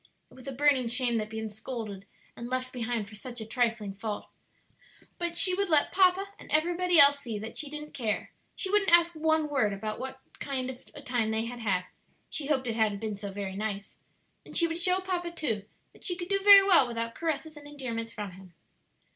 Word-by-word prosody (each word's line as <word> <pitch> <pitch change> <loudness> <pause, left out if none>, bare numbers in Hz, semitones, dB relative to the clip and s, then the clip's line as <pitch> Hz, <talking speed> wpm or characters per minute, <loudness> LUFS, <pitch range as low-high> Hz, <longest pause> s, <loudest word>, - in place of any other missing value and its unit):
It - - -17
was 255 0 -14
a - - -3
burning 270 -2 +2
shame 240 0 +2
that 215 - -1
she 220 +1 -8
had 220 - -3
been 220 - -4
scolded 210 -2 -7 0.3
and 235 +1 -7
left 255 0 -3
behind 235 -3 -3
for 210 - -14
such 240 +3 -8
a 220 - -5
trifling 225 -3 -1
fault; 210 +1 -5 0.9
but 345 -1 -3
she 370 - +5
would 395 0 -1
let 300 -3 +3
"papa" 385 +1 +3
and - - -13
everybody 350 +3 +2
else 280 0 +9
see 235 -6 -5
that 220 +2 -7
she 300 - -1
didn't 300 +1 -7
care; 225 -5 -2 0.2
she 380 - -3
wouldn't 410 -3 +3
ask 340 0 +6
one 315 -1 +1
word 260 -9 +1
about 215 +2 -5
what 265 0 -6 0.2
kind 260 -2 -2
of 255 0 -15
a 290 - -10
time 245 -5 -1
they 220 +1 0
had 240 +1 -7
had 195 -5 0 0.5
(she 295 -3 -2
hoped 270 -3 +1
it 235 - -1
hadn't 215 -3 +1
been 215 -2 -3
so 200 0 -7
very 195 -1 -5
nice); 200 -1 -4 0.5
and - - -3
she 335 - +5
would 330 0 -2
show 365 +2 +2
papa, 360 -2 -3
too, 240 -12 -3 0.3
that - - -18
she 355 - -1
could 350 0 -7
do 395 0 +2
very 400 -1 +10
well 365 -9 +5
without 230 -1 -3
caresses 315 -1 -3
and 290 -1 -12
endearments 235 -6 -5
from 210 -3 -6
him. 185 -1 -15
255 Hz, 220 wpm, -28 LUFS, 220-320 Hz, 0.9 s, very